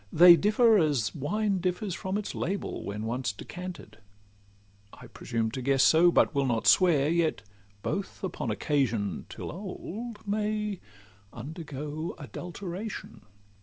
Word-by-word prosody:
They 175 +2 +9
differ 215 +3 +4
as 145 - +1
wine 195 +7 0
differs 185 +2 -2
from 190 +3 -3
its 210 - -4
label, 195 +3 -3
When 105 +2 -4
once 120 0 -1
decanted;—I 100 - -12
presume 115 -2 -3
to 130 - -4
guess 135 +1 +3
so, 170 +4 +6
But - - +3
will 140 -2 +1
not 115 -3 0
swear: 160 -7 +5
yet 165 -6 +1 0.4
both 200 0 -4
upon 175 -9 -3
occasion, 115 - -1
Till - - -6
old, 210 +4 -7
may 210 -1 -1 0.5
undergo 150 +3 -6
adulteration. 185 - -7
160 Hz, 125 wpm, -28 LUFS, 120-195 Hz, 0.5 s, They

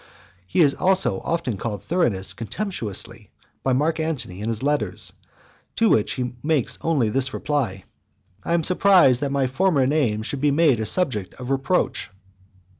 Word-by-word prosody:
He 175 - +2
is 145 -3 +5
also 190 0 +2
often 165 -11 -2
called 105 -1 -4
Thurinus 120 - 0
contemptuously, 115 - -5 0.3
by 130 - +1
Mark 155 +5 +1
Antony 125 - -3
in 110 - -2
his 115 +1 -3
letters; 110 -9 -1 0.6
to 225 -1 +3
which 105 - +2
he 125 -2 -3
makes 150 -5 0
only 145 -9 +1
this 130 +3 0
reply: 120 -11 -2 0.6
"I 170 - 0
am 170 - +1
surprised 180 -8 +5
that 140 -1 -1
my 140 -1 +1
former 140 +1 +2
name 130 -7 +1
should 130 +3 -4
be 145 - +3
made 145 -4 +3
a 110 - -2
subject 125 - -1
of 125 +1 -6
reproach." 135 +7 0
135 Hz, 160 wpm, -23 LUFS, 115-165 Hz, 0.6 s, is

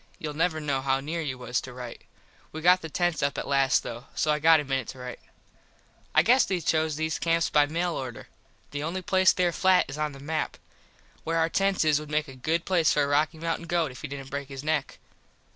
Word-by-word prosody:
Youll 150 -1 -5
never 160 +1 0
know 145 -3 -1
how 135 0 +1
near 160 +5 -3
you 135 -5 -4
was 125 0 -2
to 130 - -9
right. 125 -1 -8 0.5
We 155 - -6
got 180 +2 +5
the 160 - -6
tents 175 0 0
up 140 0 0
at - - -4
last, 135 -1 +3
though, 120 +2 -7
so 155 - +1
I 150 - +1
got 160 +1 +6
a - - -2
minit 135 -3 -2
to 135 - -8
rite. 125 -1 -7 1.0
I - - +6
guess 250 +2 +5
they 185 -2 -1
choose 160 -2 +1
these 160 +1 -2
camps 165 0 +1
by 145 -1 +4
mail 170 +3 -1
order. 130 -5 -6 0.4
The 145 - -4
only 175 +5 -3
place 190 +1 +4
there 180 -1 +1
flat 185 +1 +3
is 135 +3 -7
on 150 -1 -1
the 135 - -11
map. 155 +2 -3 0.7
Where 165 +1 -1
our 165 0 +2
tents 195 -1 +1
is 150 -1 +3
would 150 -1 -9
make 155 +1 0
a 135 - -10
good 160 +6 -1
place 170 -5 +3
for 145 - +2
a - - 0
Rocky 150 +3 +1
Mountin 165 +1 -3
goat 165 -4 0
if 125 - -11
he 150 - -4
didnt 135 -1 -8
break 140 0 -4
his 135 0 -7
neck. 155 -2 -1
155 Hz, 240 wpm, -27 LUFS, 140-165 Hz, 1.0 s, got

